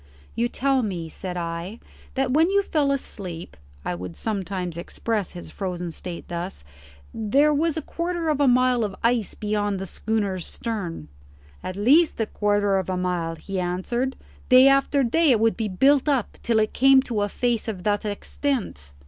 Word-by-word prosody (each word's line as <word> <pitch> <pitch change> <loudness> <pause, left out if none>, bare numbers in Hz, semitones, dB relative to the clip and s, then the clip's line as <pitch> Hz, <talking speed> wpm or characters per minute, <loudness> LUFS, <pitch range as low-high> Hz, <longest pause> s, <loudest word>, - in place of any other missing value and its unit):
"You 235 +1 0
tell 270 +1 +1
me," 180 -7 -3
said 180 +2 -6
I, 170 +5 -4 0.4
"that 265 -1 +1
when 320 +6 +4
you 400 +1 +3
fell 295 -6 +1
asleep" 180 - -4 0.3
I - - -1
would 90 -1 -7
sometimes 190 -5 -3
express 205 +3 -2
his 175 - -9
frozen 180 -3 -4
state 175 +1 -8
thus 175 - -5 0.5
"there 275 +8 +3
was 320 +2 +1
a 320 - -3
quarter 340 -1 -2
of 300 -2 +1
a 285 - +4
mile 250 -1 +4
of 200 -2 -3
ice 230 -3 +1
beyond 205 -1 -1
the 190 - -4
schooner's 200 -2 -2
stern." 195 - -4 0.5
"At 185 - -5
least 275 - +4
a 225 - +2
quarter 205 -2 +1
of 190 - -4
a 185 - -1
mile," 175 -2 -1
he 190 +3 -5
answered. 190 +9 -1 0.3
"Day 255 +1 +8
after 275 +1 +3
day 315 +7 +3
it 240 -4 +5
would 225 0 +3
be 225 -2 -2
built 270 +9 +3
up 265 -6 -1
till 230 -1 +1
it 215 0 +1
came 270 0 +6
to 230 -6 -2
a 205 - 0
face 240 -1 -1
of 195 -5 -4
that 205 +1 +1
extent." 205 - -3
215 Hz, 180 wpm, -24 LUFS, 185-265 Hz, 0.5 s, Day